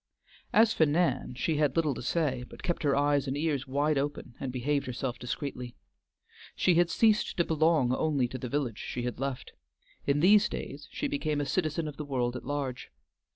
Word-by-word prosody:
As 220 +1 +5
for 160 - +3
Nan, 145 -5 +1
she 155 +5 0
had 145 -3 +2
little 155 -4 +2
to - - -6
say, 135 -2 0
but - - -12
kept 175 -2 -1
her 145 -3 +2
eyes 145 -1 +2
and 135 +1 -2
ears 145 -3 -1
wide 145 +2 +1
open, 140 -3 -4
and 135 - -3
behaved 140 +3 -1
herself 125 0 -3
discreetly. 125 -1 -5 0.8
She 180 - +3
had 175 0 +3
ceased 215 +3 +2
to 170 - +3
belong 155 -5 +3
only 140 -3 +1
to 130 - -6
the 125 - -5
village 135 -6 -2
she 120 - -4
had 125 0 -3
left; 135 -2 -4 0.6
in 140 +1 +3
these 205 +6 +6
days 145 +1 -6
she 290 - -2
became 155 - -1
a 145 - 0
citizen 155 +1 -1
of 145 -2 -7
the 150 - -4
world 125 -3 -1
at - - -7
large. 140 -3 -3
145 Hz, 200 wpm, -29 LUFS, 130-160 Hz, 0.8 s, these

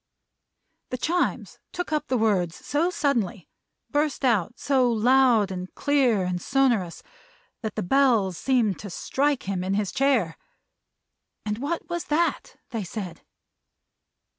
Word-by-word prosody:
The 255 - -3
Chimes 345 +8 -1
took 355 -2 -4
up 300 0 -1
the 255 - +1
words 190 -7 +1
so 310 +5 0
suddenly 240 - -1 0.4
burst 290 -2 0
out 230 -1 +1
so 260 -3 +2
loud, 235 -2 +4
and 185 0 -5
clear, 260 -8 +2
and 180 -1 -2
sonorous 240 -10 +1 0.6
that 220 -3 -4
the - - -2
Bells 225 -4 +3
seemed 230 -1 +1
to 205 - -7
strike 280 +9 -1
him 190 -2 -2
in 190 +1 -1
his 205 -2 -1
chair. 255 -12 +1 1.1
And 210 +1 -2
what 315 +5 -3
was 345 -1 -3
that, 330 +3 0 0.2
they 225 -4 -3
said? 180 -3 -6
240 Hz, 135 wpm, -25 LUFS, 195-280 Hz, 1.1 s, loud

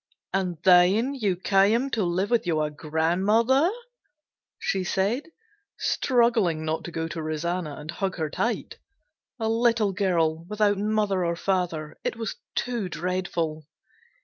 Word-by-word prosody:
"And 185 -3 -1
then 190 +8 +5
you 210 -9 0
came 205 +8 +2
to 220 -4 0
live 185 +5 -1
with 235 -6 +2
your 155 -3 0
grandmother?" 190 - +2 0.9
she 190 -1 -1
said, 205 - -1 0.5
struggling 230 - +2
not 160 +1 -2
to 170 - -6
go 165 0 -3
to 165 0 -5
Rosanna 155 0 -3
and 150 +2 -7
hug 190 +2 -2
her 155 -3 -2
tight. 235 - -2 0.6
A 220 - -1
little 225 -2 +2
girl 165 -5 +1
without 205 0 +1
mother 210 -3 +1
or 170 0 0
father! 170 -4 -2
It - - -2
was 225 - -4 0.2
too 235 -7 -2
dreadful. 170 -2 -2
185 Hz, 135 wpm, -26 LUFS, 165-220 Hz, 0.9 s, then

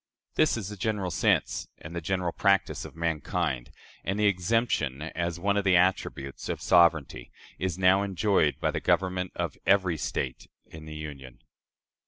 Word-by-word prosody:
This - - +3
is 100 -4 -4
the 105 - -8
general 100 -2 -1
sense - - +1
and 80 +3 -10
the 85 - -3
general 90 +1 -1
practice 100 +2 +1
of - - -11
mankind; 80 -4 -2 0.3
and 95 +3 -2
the 105 - +3
exemption, 100 - +1
as 85 +1 -3
one 100 +3 +1
of 100 - +1
the 95 -2 +4
attributes 85 -7 0
of - - -2
sovereignty, 85 -8 +3 0.3
is 95 -2 -2
now 95 +1 +4
enjoyed 100 -5 +1
by - - +1
the - - -2
government 90 -1 0
of - - -3
every 95 -4 +3
State - - -3 0.2
in 80 0 -12
the 75 0 -8
Union." 70 -5 -9
90 Hz, 165 wpm, -28 LUFS, 80-95 Hz, 0.3 s, the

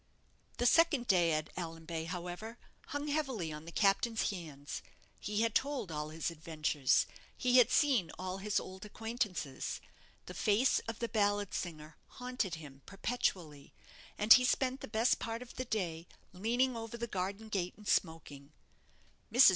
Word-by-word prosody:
The 245 - 0
second 300 -2 +5
day 175 -6 +4
at 155 0 -2
Allanbay, 165 -1 -4
however, 180 +6 -5 0.3
hung 290 +1 -3
heavily 265 - -1
on 150 +1 -7
the 170 - -8
captain's 215 +5 +2
hands. 150 -7 -6 0.4
He 210 +1 -1
had 230 -1 +2
told 265 - 0
all 150 0 -3
his 160 +2 -2
adventures; 155 -4 +1 0.3
he 250 0 +4
had 250 - +7
seen 260 - +3
all 185 +1 -4
his 210 +1 +1
old 190 +1 -9
acquaintances. 210 - -3 0.5
The - - -8
face 220 +4 +3
of 230 -1 -3
the 235 - -2
ballad 205 -3 +1
singer 155 -3 -5 0.2
haunted 250 -8 -2
him 140 -4 -11
perpetually; 180 - -2 0.4
and 210 +2 +9
he 250 - +6
spent 255 +1 +1
the - - -6
best 225 +2 +2
part 230 +1 -4
of 250 - -13
the 255 - -3
day 175 -8 -2 0.3
leaning 240 +7 +1
over 225 0 -5
the 235 - -2
garden 200 +1 -3
gate 185 -4 -2
and 210 -1 -12
smoking. 150 -4 -1 0.8
Mrs. - - +9
200 Hz, 155 wpm, -34 LUFS, 165-235 Hz, 0.8 s, and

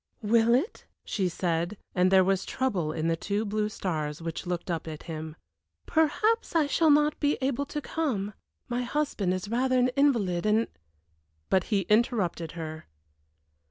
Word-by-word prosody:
"Will 230 +2 +4
it?" 305 - -2 0.2
she 190 -4 0
said, 170 +3 -1 0.2
and 180 0 +3
there 190 0 +6
was 195 0 +1
trouble 190 -12 -1
in 160 +1 -2
the 165 - +2
two 205 +6 -2
blue 210 0 -1
stars 155 -8 -3
which 165 +2 -5
looked 175 0 -3
up 165 -1 -3
at 155 -1 -7
him. 160 -1 -6 0.5
"Perhaps 385 +8 +1
I 320 -2 +4
shall 315 +2 +3
not 295 0 +4
be 290 0 +1
able 275 +1 -1
to 295 - -4
come; 235 -12 -2 0.3
my 245 0 -1
husband 245 -7 -1
is 185 +1 -2
rather 255 +4 +1
an 250 0 +4
invalid, 230 -10 +2
and 220 +2 +3 0.5
" 80 -1 -44
But 190 -1 +3
he 205 -3 +1
interrupted 195 -5 +1
her. 160 -1 -7
205 Hz, 165 wpm, -28 LUFS, 170-255 Hz, 0.5 s, there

